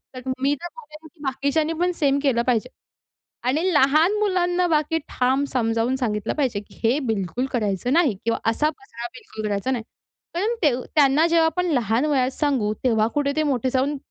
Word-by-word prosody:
तर 255 - -6 0.2
मी 275 +2 +2
तर 345 - -4
म्हणेल, 320 -10 -13
की 340 - -31
बाकीच्यांनी 280 +4 0
पण 355 +1 +2
सेम 280 -3 +2
केलं 255 -5 +2
पाहिजे, 250 0 +1 0.8
आणि 280 +5 +2
लहान 310 +8 +4
मुलांना 360 -3 +1
बाकी 310 -1 +1
ठाम 260 +2 +1
समजावून 230 0 +1
सांगितलं 215 -6 -2
पाहिजे, 260 -8 0
की 205 - -17
हे 230 +4 +3
बिलकुल 220 +3 -1
करायचं 215 +1 0
नाही, 310 - +3
किंवा 230 0 0
असा 300 +7 +1
पसरा 270 - -8
बिलकुल 220 -3 -8
करायचा 205 +5 -1
नाही, 240 -4 -2 0.5
कारण 405 +7 0
ते 295 - +5 0.2
त्यांना 295 +1 +5
जेव्हा 335 -1 +3
आपण 320 +3 0
लहान 240 -1 +1
वयात 265 -4 +1
सांगू, 260 -8 0
तेव्हा 220 -4 +3
कुठे 285 -1 +1
ते 310 - +1
मोठे 260 -4 0
जाऊन 270 +3 0
270 Hz, 180 wpm, -23 LUFS, 235-310 Hz, 0.8 s, ते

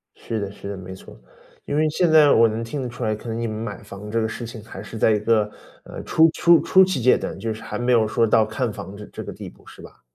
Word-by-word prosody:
是 115 - -5
的 100 -1 -4
是 100 - -9
的。 100 - -5
没 95 0 -9
错。 95 - -13 0.5
因 145 - -3
为 155 +1 +2
现 175 +3 +1
在 155 -2 +6
我 115 0 +6
能 110 +1 -3
听 135 +5 -5
得 125 - -3
出 125 +1 -7
来， 110 -1 0
可 110 - -11
能 115 0 -3
你 115 - -2
们 110 -1 -4
买 110 -2 -6
房 100 - -11
子 - - -7
这 115 +1 0
个 110 - 0
事 115 +1 -6
情 115 -2 -10
还 105 -4 -10
是 110 +2 -9
在 110 - +3
一 105 - +2
个 105 -1 +1 0.6
初 160 +1 +4
初 170 -1 +5
初 190 - +5
期 180 -8 -2
阶 125 +2 +5
段， - - -5
就 110 +3 -3
是 110 - -11
还 - - -6
没 120 +1 0
有 115 -3 +4
说 115 - +2
到 110 0 +3
看 110 +2 -2
房 100 -1 -9
这 105 +1 -9
这 - - -8
个 - - -7
地 - - -9
步， - - -22
是 - - -14
吧？ - - -15
115 Hz, 320 characters per minute, -22 LUFS, 105-125 Hz, 0.6 s, 在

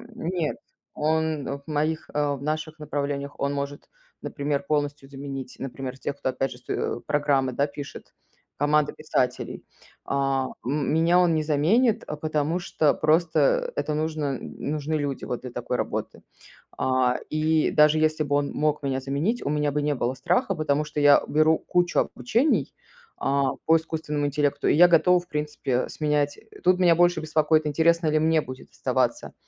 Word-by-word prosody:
нет, 170 -2 -2 0.4
он 155 -1 0
в - - -26
моих 155 +1 -1
а, 145 -1 0
в - - -13
наших 155 +1 -3
направлениях 145 -1 -3
он 140 0 -1
может, 140 0 -5 0.3
например, 145 -1 -2
полностью 145 -1 -2
заменить, 135 -2 -7
например, 135 -1 -6
тех, 140 +1 -4
кто 130 - -2
опять 135 +1 -2
же 125 - -9
с - - -28
ть 120 - -3
программы, 140 -3 +1
да, 140 +4 0
пишет, 145 0 -9 0.4
команда 150 +1 +2
писателей. 130 -5 -2 0.4
А 135 -1 0 0.2
м 145 +3 0
меня 165 +3 +4
он 175 -2 +3
не 155 - +1
заменит, 210 - +2
а, - - -4
потому 155 +2 -1
что 155 -4 +1
просто 175 - +2
это 155 - -1
нужно 150 -3 -2
нужны 150 +1 -4
люди 145 -3 -2
вот 125 - -4
для 125 - -7
такой 120 +1 -3
работы. - - -3 0.6
А, 130 -1 +2
и 155 0 +1
даже 150 +1 +5
если 155 0 +2
бы 145 -1 0
он 145 0 0
мог 150 -1 0
меня 135 -1 -1
заменить, 140 - -1
у - - 0
меня 150 0 0
бы 150 +1 -1
не 145 0 0
было 125 0 -1
страха, 250 - +1
потому 150 -2 0
что 150 0 -5
я 145 -1 +6
беру 155 +1 +4
кучу 175 -1 +1
обучений, 230 - 0 0.5
а, 140 -1 +1 0.2
по 160 - +5
искусственному 155 -2 -1
интеллекту, 145 0 0
и - - +4
я 175 +3 +8
готова, 180 +1 +5
в 175 - -13
принципе, 150 -4 -2
сменять 150 -1 -1 0.2
Тут 185 0 +4
меня 175 -2 +5
больше 175 0 +3
беспокоит, 155 0 +2
интересно 165 +2 +2
ли 155 0 +2
мне 160 +1 +3
будет 130 -2 -10
оставаться - - -1
150 Hz, 170 wpm, -25 LUFS, 140-160 Hz, 0.6 s, я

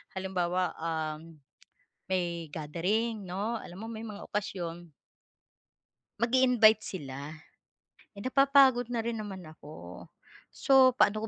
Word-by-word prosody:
halimbawa, 185 -1 -1
um, 160 0 -4 0.7
may 170 -3 -2
gathering, 195 +9 -1
'no, 210 +6 -2
alam 180 0 -11
mo, - - -5
may 220 - -6
mga 205 -2 -8
okasyon. 175 -4 -4 1.3
Mag-iinvite 235 -2 +5
sila, 140 -8 -7 0.9
napapagod 265 +1 +4
na 235 -2 -2
rin 235 -1 -3
naman 195 -4 -7
ako. 155 -1 -11 0.5
So, 260 -2 +5
paano 215 -2 +2
195 Hz, 100 wpm, -30 LUFS, 170-230 Hz, 1.3 s, Mag-iinvite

